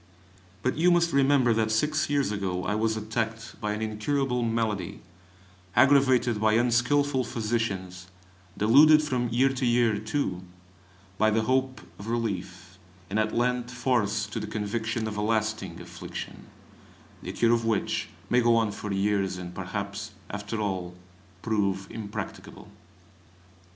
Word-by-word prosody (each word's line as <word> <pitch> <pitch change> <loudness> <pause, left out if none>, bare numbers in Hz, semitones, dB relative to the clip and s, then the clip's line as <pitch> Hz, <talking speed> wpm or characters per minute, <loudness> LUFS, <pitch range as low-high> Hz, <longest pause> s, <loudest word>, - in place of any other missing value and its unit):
But 130 - 0
you 175 +2 +5
must 170 -1 +3
remember 135 -3 +4
that 110 0 +1
six 150 +9 +1
years 140 -6 +1
ago 95 -3 -2
I 95 - -1
was 110 +1 0
attacked 115 +1 -4
by 105 0 -1
an 105 +1 -3
incurable 125 +4 -1
malady, 110 -5 -2 0.7
aggravated 130 -5 +4
by 110 0 +3
unskilful 125 +4 +2
physicians, 100 -6 -3 0.5
deluded 150 +8 +6
from 125 -5 -1
year 125 +4 +3
to 130 0 -3
year, 120 -3 +3
too, 110 -4 -2 0.8
by 110 - +4
the 110 +1 +1
hope 130 +2 0 0.2
of 105 - -8
relief, 95 -6 -4 0.3
and 105 - +1
at 110 0 0
length 125 0 0
forced 120 -4 0
to - - -2
the - - -5
conviction 110 +1 -2
of 105 -1 -5
a - - -1
lasting 110 0 -1
affliction - - -8 0.7
(the - - -5
cure 115 0 +3
of 115 -1 +1
which 115 -2 -1 0.2
may 125 - +3
go 120 0 +4
on 115 -2 +2
for 105 0 -6
years, 95 -1 0
and 90 -1 -7
perhaps 100 +2 -5 0.2
after 105 +2 -4
all 95 -4 -3 0.5
prove 100 -3 0
impracticable). 105 -2 -7
110 Hz, 140 wpm, -27 LUFS, 105-125 Hz, 0.8 s, deluded